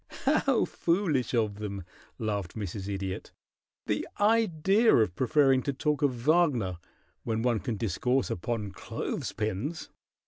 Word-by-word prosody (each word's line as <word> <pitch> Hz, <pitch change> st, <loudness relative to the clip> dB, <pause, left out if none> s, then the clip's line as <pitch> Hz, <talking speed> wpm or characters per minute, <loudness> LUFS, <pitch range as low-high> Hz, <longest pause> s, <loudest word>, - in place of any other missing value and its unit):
"How 275 Hz, -3 st, +3 dB
foolish 165 Hz, -9 st, 0 dB
of 105 Hz, -3 st, 0 dB
them!" 100 Hz, -3 st, -5 dB, 0.3 s
laughed 105 Hz, -6 st, -3 dB
Mrs. 100 Hz, -2 st, -5 dB
Idiot. 95 Hz, -1 st, -4 dB, 0.5 s
"The -, -, -1 dB
idea 210 Hz, 0 st, +4 dB
of 110 Hz, -6 st, +3 dB
preferring 135 Hz, +1 st, +3 dB
to 140 Hz, -, -2 dB
talk 150 Hz, +2 st, -1 dB
of 140 Hz, -4 st, +2 dB
Wagner 140 Hz, -, +2 dB, 0.4 s
when 110 Hz, 0 st, -1 dB
one 120 Hz, -3 st, +2 dB
can 120 Hz, -1 st, -3 dB
discourse 125 Hz, +6 st, 0 dB
upon 105 Hz, +2 st, -3 dB
clothes -, -, -4 dB
pins!" 110 Hz, -, -3 dB
125 Hz, 130 wpm, -29 LUFS, 105-155 Hz, 0.5 s, idea